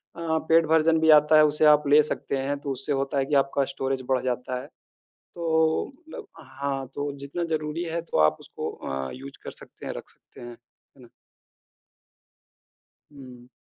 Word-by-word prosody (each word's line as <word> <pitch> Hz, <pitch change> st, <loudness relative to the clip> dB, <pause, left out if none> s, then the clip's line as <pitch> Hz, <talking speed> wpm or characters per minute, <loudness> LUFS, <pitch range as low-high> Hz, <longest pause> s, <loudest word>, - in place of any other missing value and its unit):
अ, -, -, -11 dB, 0.3 s
paid 165 Hz, 0 st, +5 dB
version 160 Hz, 0 st, +4 dB
भी 160 Hz, 0 st, +2 dB
आता 150 Hz, +1 st, +2 dB
है, 155 Hz, -, +7 dB
उसे 150 Hz, +1 st, +2 dB
आप 150 Hz, -1 st, +5 dB
ले 150 Hz, +1 st, +7 dB
सकते 140 Hz, -2 st, -3 dB
हैं। 140 Hz, +1 st, -2 dB
तो 140 Hz, -1 st, -4 dB
उससे 135 Hz, +2 st, -2 dB
होता 135 Hz, +1 st, -2 dB
है 135 Hz, -, 0 dB
कि 145 Hz, -, -1 dB
आपका 140 Hz, 0 st, -1 dB
स्टोरेज 135 Hz, 0 st, -2 dB
बढ़ 130 Hz, -, +3 dB
जाता 125 Hz, 0 st, -2 dB
है। 140 Hz, -, -11 dB, 0.7 s
तो 160 Hz, -2 st, +1 dB
मतलब 345 Hz, +8 st, -11 dB
हाँ, 135 Hz, -1 st, -4 dB
तो 145 Hz, 0 st, -3 dB
जितना 140 Hz, +5 st, -4 dB
ज़रूरी 155 Hz, +2 st, -4 dB
है 170 Hz, 0 st, -3 dB
तो 170 Hz, -, -4 dB
आप 75 Hz, 0 st, +4 dB
उसको -, -, -6 dB
अ, 65 Hz, 0 st, -5 dB
यूज़ 135 Hz, +2 st, -10 dB
कर -, -, -7 dB
सकते -, -, -14 dB
हैं, -, -, -3 dB
रख -, -, -9 dB
सकते -, -, -18 dB
हैं, 120 Hz, 0 st, -8 dB
है 120 Hz, +3 st, -24 dB
ना? -, -, -15 dB, 2.0 s
हुँ। 125 Hz, -4 st, -13 dB
140 Hz, 185 wpm, -25 LUFS, 135-160 Hz, 2.0 s, है